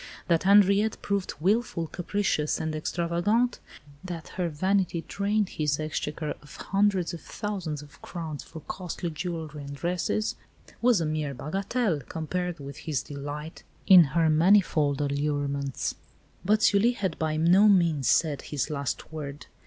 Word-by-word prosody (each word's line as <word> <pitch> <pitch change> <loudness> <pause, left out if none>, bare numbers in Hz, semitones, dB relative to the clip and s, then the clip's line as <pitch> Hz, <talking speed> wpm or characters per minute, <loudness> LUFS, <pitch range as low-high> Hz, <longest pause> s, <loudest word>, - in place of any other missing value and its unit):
That 170 0 +2
Henriette 200 +2 +5
proved 200 -2 -1
wilful, 195 -1 +1
capricious, 175 -2 -1
and 160 0 -2
extravagant 175 +10 0 0.4
that 175 -4 -6
her 180 -2 -2
vanity 180 +1 0
drained 205 0 0
his 150 -1 -1
exchequer 155 0 -3
of 150 0 -14
hundreds 195 -3 +1
of 170 - -7
thousands 180 -9 -4
of 145 -1 -17
crowns 160 -4 -6
for 160 - -10
costly 175 +1 -5
jewellery 155 -1 -5
and 140 0 -7
dresses, 180 +7 -1 0.4
was 235 -6 +4
a - - 0
mere 155 -2 -2
bagatelle, 195 - -1
compared 175 +1 -3
with 140 0 -8
his 150 -7 -2
delight 145 +2 -7 0.2
in 185 -3 +9
her 165 -1 +4
manifold 155 -4 +3
allurements. 140 -1 -1 0.5
But 215 +3 +2
Sully 215 +4 +4
had 190 -8 -3
by 155 -1 0
no 180 +6 +5
means 170 - +3
said 150 -4 +2
his 145 0 -3
last 140 +1 -4
word. 145 -2 -6
165 Hz, 140 wpm, -27 LUFS, 150-195 Hz, 0.5 s, in